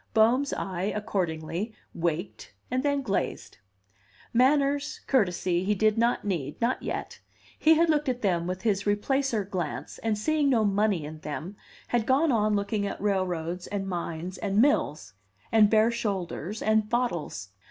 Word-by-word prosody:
Bohm's 245 +6 +4
eye, 190 +2 -2
accordingly, 185 0 -2 0.2
waked 170 +2 -3 0.2
and 255 +1 +1
then 285 0 0
glazed. 200 - -3 0.7
Manners, 280 +3 +2
courtesy, 180 -7 +1
he 210 +2 +1
did 215 +1 +3
not 235 0 +1
need, 155 -8 -3
not 240 +2 0
yet; - - -5 0.4
he 320 +1 +6
had 335 +2 +4
looked 300 -3 +2
at 250 -1 -3
them 175 -4 +1
with 185 +1 -4
his 200 -3 +1
Replacer 220 +1 0
glance, 185 -3 -4
and, 220 -2 -1
seeing 295 +5 +1
no 230 -5 +3
money 200 -5 +1
in 155 +1 -8
them, 155 +5 -6 0.3
had 235 -2 0
gone 280 +4 +3
on 215 -3 +2
looking 200 0 -1
at - - -5
railroads, 180 -3 -1
and 195 -1 -3
mines, 175 0 -4
and 200 0 0
mills, 155 - +2 0.4
and 215 -2 +6
bare 220 +1 +4
shoulders, 205 -3 -3
and 220 -1 +2
bottles. 175 - -2
210 Hz, 150 wpm, -27 LUFS, 180-240 Hz, 0.7 s, he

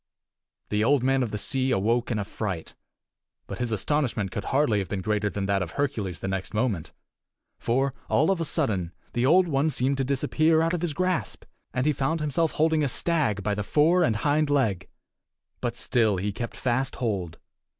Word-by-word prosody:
The 105 0 +1
Old 135 +2 +3
Man 135 0 +2
of 120 - 0
the 105 - -3
Sea 130 +5 0
awoke 115 +2 +1
in 115 - 0
a 105 - -2
fright 95 -6 -5 0.7
But - - -7
his 120 -1 -1
astonishment 110 -3 0
could 105 - -4
hardly 135 -6 +2
have 95 -3 -4
been 95 -2 -3
greater 105 -1 0
than 100 -1 -3
that 100 0 +1
of 85 -3 -4
Hercules 105 - -2
the - - -3
next 95 +2 -3
moment. 105 -8 -1 0.7
For, 135 +3 0 0.2
all 155 +6 +3
of 185 -3 0
a - - 0
sudden, 100 - -1 0.2
the 120 +2 +1
Old 180 +4 +5
One 145 0 +1
seemed 135 -1 0
to - - +2
disappear 155 +4 +2
out 165 +1 +1
of 175 - -1
his 175 -4 -1
grasp, 185 - -1 0.3
and 130 +1 -1
he 150 - +3
found 150 +5 -1
himself 150 +2 0
holding 160 0 +2
a 140 - +1
stag 140 - 0
by 105 +1 0
the 105 0 -2
fore 160 - +3
and 115 -9 +2
hind 145 +5 +1
leg! 115 -11 +1 0.7
But - - -2
still 110 -5 +1
he 100 +3 -1
kept 115 +3 -6
fast 130 +2 0
hold. 95 -9 -2
125 Hz, 200 wpm, -26 LUFS, 105-150 Hz, 0.7 s, Old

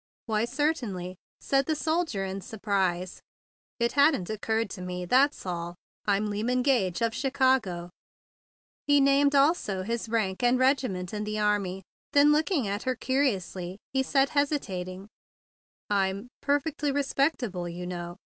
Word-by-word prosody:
"Why, 220 -1 +1
certainly!" 240 - -2 0.2
said 275 0 +1
the 315 - +1
soldier 315 - -1
in 190 +1 -4
surprise. 190 -3 -2 0.6
"It 235 0 +2
hadn't 280 - +3
occurred 220 0 -1
to 185 - -7
me; 180 0 -4
that's 265 +8 +3
all. 175 -1 -4 0.3
I'm 205 +1 +1
Lyman 245 +5 0
Gage, 235 -9 +1
of 230 -1 +2
Chi¬ 265 +4 -2
cago." 235 -11 +1 1.0
He 290 0 +5
named 280 +1 +4
also 275 - +2
his 230 +2 -3
rank 215 -4 0
and 245 +1 +4
regiment 255 -9 +1
in 210 0 -2
the 215 0 -3
army. 200 -3 0 0.3
Then, 290 +1 +6
looking 305 - +1
at 200 +2 -2
her 255 -1 -1
curiously, 195 -10 -1 0.2
he 265 - +2
said, 270 +1 +2
hesitating: 195 -11 -2 0.8
"I'm—perfectly 265 +10 -1
respectable, 270 - 0
you 175 +1 -6
know. 175 -1 -6
225 Hz, 135 wpm, -28 LUFS, 190-275 Hz, 1.0 s, Then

